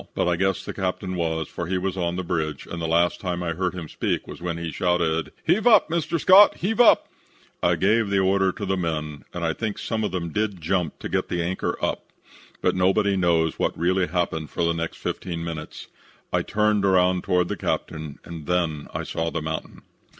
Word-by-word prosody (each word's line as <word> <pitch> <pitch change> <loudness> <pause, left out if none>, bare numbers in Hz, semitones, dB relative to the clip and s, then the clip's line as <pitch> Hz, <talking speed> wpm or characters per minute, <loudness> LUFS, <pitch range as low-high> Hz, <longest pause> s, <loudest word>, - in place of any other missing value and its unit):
But - - +1
I 90 - +2
guess 95 +1 0
the - - -5
captain 95 0 -2
was, 80 -2 -1
for 85 - -5
he 95 +1 0
was 95 +1 -2
on 85 -2 -1
the 90 - -3
bridge, 80 -3 -2
and 85 - -6
the 80 - -1
last 85 +2 +2
time 90 -2 -2
I 85 - -1
heard 90 +2 -2
him 85 -3 -6
speak - - -2
was - - -10
when 85 -1 -3
he 85 -1 -4
shouted, 85 -1 0
'Heave 220 +4 +2
up, 215 -8 +6
Mr. 170 0 0
Scott; 190 +6 +7
heave 220 +6 -1
up.' 240 - +6 0.5
I - - +3
gave 105 +2 +2
the 100 - +1
order 95 0 +3
to 100 - -6
the 95 0 0
men, 75 -4 -3
and 85 -1 -3
I 80 - +1
think 110 +1 -3
some 110 -1 -2
of 105 - -1
them 85 -2 -3
did 105 -2 -1
jump 85 -1 -1
to - - -3
get - - 0
the 85 -1 -1
anchor 90 +2 -2
up, - - -4 0.5
but - - +3
nobody 95 +2 +2
knows 85 -3 +1
what - - 0
really 90 +2 +1
happened 85 -3 -2
for - - -2
the 85 0 +2
next 85 0 -4
fifteen 85 -2 -4
minutes. 80 -2 -6 0.5
I - - +3
turned 105 -1 +1
around 90 -1 +3
toward 90 -1 +2
the - - -2
captain 75 -2 -3
and 85 -3 -8
then 85 -5 0
I - - -2
saw 80 0 -2
the 80 - -3
mountain. 80 0 -5
90 Hz, 215 wpm, -24 LUFS, 85-95 Hz, 0.5 s, Scott